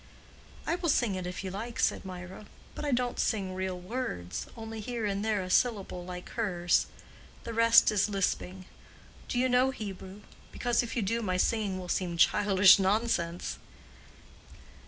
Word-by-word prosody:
"I - - 0
will 340 -2 -1
sing 240 -7 +2
it 185 -1 -4
if 180 +1 -5
you 190 - -4
like," 225 +5 -6
said - - +1
Mirah, 185 +2 -8 0.3
"but - - -7
I 290 - -1
don't 245 -1 0
sing 195 -4 0
real 185 -1 -3
words—only 220 - -5
here 230 +1 -3
and 200 0 -1
there 215 -3 0
a 185 - -7
syllable 200 -7 +1
like 180 0 -8
hers—the 185 +2 -2
rest 230 0 +6
is 210 0 +2
lisping. 190 -1 -2 0.6
Do - - -3
you 255 +1 +3
know 255 +1 +3
Hebrew? 200 -4 -7 0.3
because 240 -1 +1
if 240 - -5
you 235 - 0
do, 230 +4 -1
my 185 -4 -1
singing 205 -1 0
will 185 -1 -7
seem 175 -1 -1
childish 200 +1 +6
nonsense." 190 -4 0
200 Hz, 155 wpm, -29 LUFS, 185-230 Hz, 0.6 s, rest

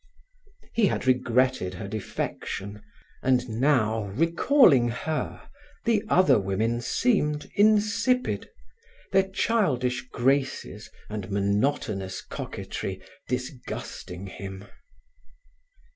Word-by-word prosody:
He 225 -3 +4
had - - -2
regretted 125 -6 +2
her 100 - -6
defection, 100 0 -4 0.4
and 125 -1 +2
now, 115 -3 +2
recalling 165 - +4
her, 155 +6 -4 0.4
the 225 -3 +2
other 185 - +5
women 110 +5 0
seemed 150 - +1
insipid, 215 +4 +2 0.6
their 195 -1 +3
childish 130 - 0
graces 135 +2 0 0.2
and 105 -3 -5
monotonous 100 -1 -1
coquetry - - -5 0.3
disgusting 125 -7 -5
him. 95 +1 -8
125 Hz, 85 wpm, -26 LUFS, 105-165 Hz, 0.6 s, other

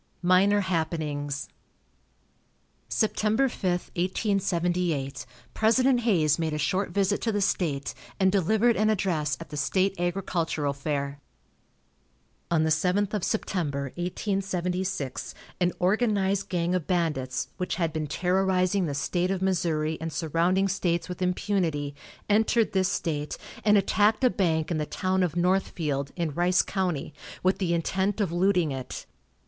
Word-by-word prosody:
MINOR 195 +3 +4
HAPPENINGS. 155 -5 -2 1.4
Sept. 220 - 0
5, 215 +2 +1 0.6
1878, 175 - 0 0.3
President 250 +3 +3
Hayes 170 -10 +2
made 160 -2 -1
a - - -1
short 185 +7 0
visit 200 0 +1
to 225 - 0
the 205 - 0
state, 160 -8 0 0.3
and 190 -1 +4
delivered 220 +5 +3
an 215 +1 +2
address 165 -9 0
at - - -9
the 150 - -6
state 185 +7 +1
agricultural 170 -5 -1
fair. 140 0 -3 1.3
On 165 -2 +2
the 160 - +1
7th 185 +6 +1
of 210 -4 -1
September, 145 - -1
1876, 180 - -2 0.2
an 180 -1 +2
organized 200 0 +1
gang 175 -1 0
of 180 -4 -1
bandits, 150 -8 -1
which 180 - -2
had 165 -3 -1
been 155 -1 -2
terrorizing 185 +2 +1
the 145 - -3
State 175 +5 0
of 190 -1 -1
Missouri 160 -4 0
and 165 0 -3
surrounding 170 +5 +1
states 175 -2 -1
with 180 0 -6
impunity, 180 -6 0 0.3
entered 220 +2 +3
this 190 -1 +2
state, 150 -4 -2 0.3
and 210 -1 +5
attacked 210 +4 +2
a 250 - +5
bank 160 -4 0
in 160 - 0
the 150 - -2
town 185 0 0
of 175 -3 0
Northfield, 170 -6 0
in 170 -4 -2
Rice 175 +3 +3
county, 180 -7 -2 0.3
with 185 +1 +2
the 175 -3 +1
intent 190 +5 0
of 195 -5 0
looting 180 -3 +2
it. 130 -2 -6
180 Hz, 140 wpm, -27 LUFS, 155-195 Hz, 1.4 s, and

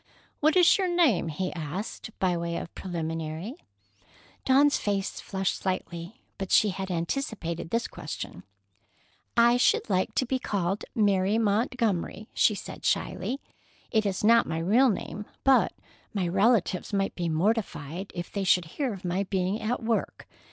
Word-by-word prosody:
"What 310 +4 +3
is 360 +2 +6
your 380 - +2
name?" 335 - +3
he 180 +4 -3
asked, 175 +7 -5
by 185 -2 +1
way 170 0 -2
of - - -6
preliminary. 165 +2 -4 0.9
Dawn's 280 +2 +5
face 200 -2 -2
flushed 190 -1 -2
slightly, 185 +3 -4 0.2
but 195 -1 -3
she 215 - +5
had 190 0 -4
anticipated 170 -2 -3
this 230 +4 0
question. - - -7 1.0
"I 235 +1 +6
should 245 - +2
like 185 0 +1
to 255 - +2
be 260 +1 -1
called 195 -4 -1
Mary 200 -2 +3
Montgomery," 215 -2 0
she 210 - +3
said - - -8
shyly. 270 +3 -1 0.5
"It 220 -3 +2
is 190 0 -2
not 230 +2 +5
my 160 - -2
real 220 +11 +4
name, 210 0 -4 0.2
but 270 -1 +5 0.4
my 185 -3 0
relatives 195 +1 +2
might 195 -1 0
be 175 -2 -2
mortified 175 -1 -1
if 175 -1 -5
they 200 - -2
should 180 -2 +3
hear 245 - -3
of 190 - -11
my 180 +3 0
being 190 +2 -1
at 230 +2 -2
work. 225 0 -2
195 Hz, 150 wpm, -27 LUFS, 175-230 Hz, 1.0 s, is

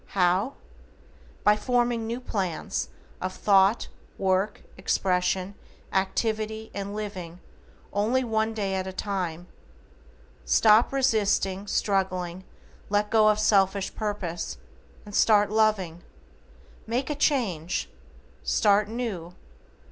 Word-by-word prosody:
How? 185 +8 +2 0.9
By 210 - +5
forming 240 0 0
new 235 +2 -3
PLANS 190 -9 -3 0.3
of 185 0 -3
thought, 195 +2 +3 0.3
work, 190 +1 0
expression, 185 0 0 0.4
activity, 220 +3 -1
and 200 0 -5
living 185 -5 -6 0.5
only 225 +6 +1
one 220 -1 0
day 200 -3 -1
at 190 0 -2
a 190 - -5
time. 180 -4 -3 1.0
Stop 215 - +5
resisting, 210 -7 +1
struggling, 185 -3 -1 0.4
let 205 +1 +1
go 220 -1 +5
of 210 - +3
selfish 200 -2 +2
purpose, 195 - -4 0.5
and 205 - -11
start 210 -1 +4
loving. 210 -6 +1 0.9
Make 255 +5 -1
a - - -1
change. 210 - 0 0.6
Start 205 0 +3
new. 210 -8 -4
205 Hz, 100 wpm, -26 LUFS, 185-220 Hz, 1.0 s, By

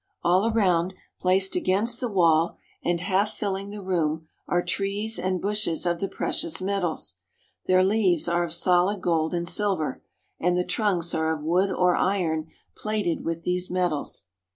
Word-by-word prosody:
All 185 +6 +3
around, 185 -4 +2 0.2
placed 190 +1 +2
against 220 +6 +1
the 250 - -1
wall 170 -4 +3 0.3
and 175 0 0
half 195 +4 0
filling 200 -1 -3
the 205 -1 -8
room, 160 -4 -1 0.2
are 175 0 +1
trees 205 +3 -1
and 185 0 -1
bushes 200 -4 -1
of 170 -1 0
the 195 - -1
precious 165 -3 -1
metals. 185 - -2 0.5
Their 185 0 +5
leaves 190 -5 +2
are 170 0 +1
of 170 - -4
solid 180 +4 +3
gold 165 -2 0
and 170 0 -2
silver, 180 -8 0 0.4
and 180 +1 +1
the 180 - 0
trunks 185 -7 +1
are 160 0 +1
of 150 - -11
wood 180 +5 +2
or 180 -1 +2
iron 165 -5 0 0.3
plated 210 -6 -2
with 165 0 -3
these 180 +1 -1
metals. 175 - -1
180 Hz, 160 wpm, -25 LUFS, 170-195 Hz, 0.5 s, Their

